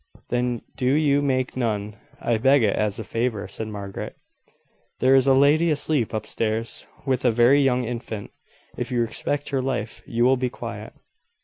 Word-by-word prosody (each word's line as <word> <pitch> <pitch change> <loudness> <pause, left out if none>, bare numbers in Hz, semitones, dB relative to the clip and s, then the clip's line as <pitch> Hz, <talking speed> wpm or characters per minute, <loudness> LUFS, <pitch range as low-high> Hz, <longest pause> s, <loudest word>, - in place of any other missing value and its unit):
"Then 120 -1 -1
do 125 - -1
you 145 -1 +3
make 130 -2 0
none 105 -4 -2 0.2
I 115 -2 0
beg 135 +2 +4
it 105 - +2
as 105 -1 0
a 110 - -4
favour," 110 -1 -2
said 105 +3 -5
Margaret. 100 -2 -6 0.8
"There 130 +1 +4
is 135 0 +5
a 135 - +6
lady 150 +5 +4
asleep 150 -5 +1
up 110 -1 -3
stairs, 115 +1 -2 0.2
with 130 -3 0
a 125 - +5
very 120 +5 +5
young 125 -2 +2
infant. 115 -3 -5 0.4
If 125 +1 -4
you 120 -1 +1
respect 140 +5 -2
her 135 -2 0
life 125 -4 -3
you 120 +1 +1
will 130 +1 +4
be 125 0 -1
quiet." - - -7
125 Hz, 180 wpm, -24 LUFS, 110-135 Hz, 0.8 s, a